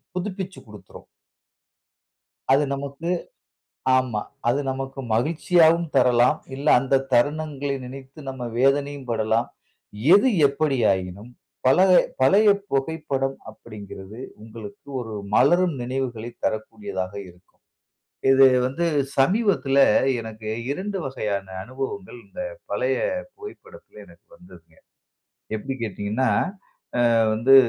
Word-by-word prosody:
புதுப்பிச்சுக் 190 Hz, 0 st, -5 dB
கொடுத்துரும். 105 Hz, -1 st, -13 dB, 1.5 s
அது 145 Hz, +2 st, +4 dB
நமக்கு 140 Hz, +4 st, -6 dB, 0.9 s
ஆமா. 120 Hz, -5 st, -1 dB, 0.3 s
அது 130 Hz, +4 st, +2 dB
நமக்கு 135 Hz, +1 st, -6 dB, 0.2 s
மகிழ்ச்சியாகவும் 165 Hz, +4 st, +3 dB
தரலாம். 125 Hz, -1 st, +4 dB, 0.2 s
இல்ல 140 Hz, +3 st, -5 dB
அந்த 135 Hz, +1 st, +1 dB, 0.2 s
தருணங்களை 145 Hz, +1 st, 0 dB
நினைத்து 135 Hz, +3 st, -11 dB
நம்ம 130 Hz, -2 st, -6 dB, 0.2 s
வேதனையும் 140 Hz, 0 st, +1 dB
படலாம். 110 Hz, +1 st, +1 dB, 0.7 s
எது 230 Hz, +6 st, +6 dB, 0.2 s
எப்பிடியாயினும் 110 Hz, -8 st, 0 dB, 0.4 s
பழ 130 Hz, -, +5 dB, 0.4 s
பழைய 205 Hz, +10 st, +5 dB, 0.2 s
புகைப்படம் 135 Hz, -1 st, -1 dB
அப்பிடிங்கிறது, 105 Hz, -1 st, -11 dB, 0.2 s
உங்களுக்கு 110 Hz, +1 st, -11 dB
ஒரு 115 Hz, -3 st, -6 dB, 0.2 s
மலரும் 175 Hz, +7 st, +4 dB
நினைவுகளை 120 Hz, -2 st, -3 dB
தரக்கூடியதாக 110 Hz, -, -3 dB, 0.2 s
இருக்கும். 90 Hz, +1 st, -23 dB, 0.7 s
இது 135 Hz, 0 st, +7 dB, 0.2 s
வந்து 165 Hz, +7 st, -2 dB, 0.3 s
சமீபத்துல 150 Hz, -, +2 dB, 0.4 s
எனக்கு 110 Hz, -1 st, -8 dB, 0.2 s
2 195 Hz, +6 st, -3 dB
வகையான 105 Hz, -7 st, -3 dB, 0.2 s
அனுபவங்கள் 135 Hz, -, -6 dB
இந்த -, -, -9 dB, 0.3 s
பழைய -, -, 0 dB, 0.4 s
புகைப்படத்தில 415 Hz, 0 st, -13 dB
எனக்கு -, -, -20 dB
வந்ததுங்க. -, -, -18 dB, 0.8 s
எப்பிடி 135 Hz, +5 st, -4 dB
கேட்டீங்கன்னா, 110 Hz, +4 st, -1 dB, 0.8 s
அ -, -, +3 dB, 0.2 s
வந்து 125 Hz, +5 st, +5 dB
135 Hz, 95 wpm, -23 LUFS, 115-155 Hz, 1.5 s, இது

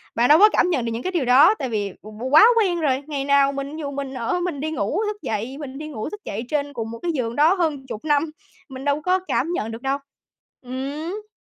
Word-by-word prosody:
bạn 235 Hz, +2 st, +3 dB
đâu 305 Hz, +3 st, +7 dB
có 425 Hz, +1 st, +8 dB
cảm 360 Hz, -, +3 dB
nhận 265 Hz, -9 st, 0 dB
được 230 Hz, -, -2 dB
những 230 Hz, +2 st, -4 dB
cái 370 Hz, -, -2 dB
điều 340 Hz, -8 st, 0 dB
đó, 280 Hz, -, +7 dB
tại 265 Hz, -, -2 dB
vì 205 Hz, -4 st, -2 dB
qu 215 Hz, +4 st, -7 dB
quá 315 Hz, +9 st, +9 dB
quen 365 Hz, -5 st, +1 dB
rồi. 280 Hz, -3 st, 0 dB
Ngày 280 Hz, -3 st, -3 dB
nào 280 Hz, 0 st, +4 dB
mình 280 Hz, +1 st, -5 dB
ví -, -, -7 dB
dụ 285 Hz, -2 st, -4 dB
mình 275 Hz, -1 st, -5 dB
ở, 250 Hz, +8 st, -1 dB
mình 350 Hz, -5 st, -3 dB
đi 315 Hz, +3 st, -3 dB
ngủ, 315 Hz, -, -1 dB
thức 420 Hz, 0 st, -3 dB
dậy, 225 Hz, +5 st, -3 dB
mình 275 Hz, -3 st, -7 dB
đi 305 Hz, +1 st, -6 dB
ngủ, 260 Hz, -6 st, -5 dB
thức 420 Hz, +3 st, -9 dB
dậy 210 Hz, +3 st, -4 dB
trên 285 Hz, -1 st, -1 dB
cùng 225 Hz, -3 st, -5 dB
một 230 Hz, -, -8 dB
cái 345 Hz, -, 0 dB
giường 240 Hz, -6 st, -2 dB
đó 310 Hz, +5 st, +5 dB
hơn 310 Hz, -7 st, -1 dB
chục 220 Hz, +3 st, -7 dB
năm, 300 Hz, +1 st, +1 dB, 0.4 s
mình 265 Hz, +1 st, -8 dB
đâu 285 Hz, +1 st, +1 dB
có 365 Hz, +3 st, +2 dB
cảm 320 Hz, +6 st, 0 dB
nhận 225 Hz, -8 st, -2 dB
được 225 Hz, +2 st, -8 dB
đâu. 270 Hz, 0 st, 0 dB, 0.7 s
Ừm! 295 Hz, +11 st, -5 dB
280 Hz, 265 wpm, -22 LUFS, 250-315 Hz, 0.7 s, quá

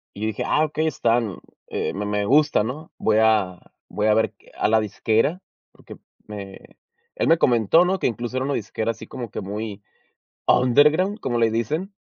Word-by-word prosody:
Y 100 Hz, -, -9 dB
yo -, -, 0 dB
dije: 110 Hz, -, -3 dB
"Ah, 155 Hz, -, +2 dB
okey, 155 Hz, +1 st, -1 dB
están, 115 Hz, -, 0 dB, 0.3 s
eh, -, -, -3 dB
me 105 Hz, +2 st, -4 dB
me 105 Hz, 0 st, -1 dB
gusta, 145 Hz, -1 st, +3 dB
¿no? 140 Hz, +8 st, -6 dB
Voy 110 Hz, -1 st, +1 dB
a 105 Hz, -5 st, +2 dB, 0.3 s
voy 105 Hz, +1 st, -2 dB
a 105 Hz, -, +4 dB
ver 110 Hz, -, +1 dB, 0.2 s
a -, -, +1 dB
la 110 Hz, 0 st, +4 dB
disquera", 110 Hz, -, 0 dB, 0.3 s
porque -, -, -13 dB, 0.3 s
me 100 Hz, -2 st, -8 dB, 0.6 s
él -, -, 0 dB
me 165 Hz, -, +5 dB
comentó, 120 Hz, -, +4 dB
¿no?, 190 Hz, +1 st, 0 dB
que -, -, 0 dB
incluso 120 Hz, +1 st, -3 dB
era 130 Hz, -, 0 dB
una 140 Hz, 0 st, -1 dB
disquera 110 Hz, +1 st, -2 dB
así -, -, -12 dB
como 120 Hz, -4 st, -7 dB
que -, -, -5 dB
muy 105 Hz, +1 st, -6 dB, 0.6 s
underground, 150 Hz, -, +4 dB
como 120 Hz, -2 st, -1 dB
le 115 Hz, -1 st, +3 dB
dicen. 155 Hz, -, -2 dB
115 Hz, 190 wpm, -23 LUFS, 105-150 Hz, 0.6 s, me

